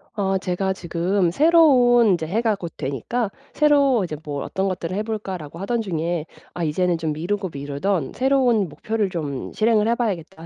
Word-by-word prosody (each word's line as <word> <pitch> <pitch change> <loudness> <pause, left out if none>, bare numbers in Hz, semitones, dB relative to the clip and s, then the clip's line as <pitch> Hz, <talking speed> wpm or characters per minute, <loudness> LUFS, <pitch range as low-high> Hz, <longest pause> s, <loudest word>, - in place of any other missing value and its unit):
어 195 -2 0
제가 190 +1 -1
지금 175 +1 0
새로운 255 - +5
인제 160 -3 0
해가 220 +4 +1
곧 170 -4 -7
되니까 195 - -2 0.2
'새로 280 -6 +4
이제 155 -4 -4
뭐 145 -2 -4
어떤 190 +1 -2
것들을 185 -1 -3
해 210 - -1
볼까?'라고 190 -8 -5
하던 230 +5 -1
중에 170 -4 -2 0.3
'아 175 - -2
이제는 175 +3 +1
좀 160 -2 -2
미루고 190 +5 -2
미루던 145 +4 -2
새로운 255 -6 +2
목표를 215 +6 -2
좀 150 -7 -5
실행을 220 -1 +2
해 235 - +2
봐야겠다.' 190 -7 -3
190 Hz, 350 characters per minute, -22 LUFS, 165-225 Hz, 0.3 s, 새로운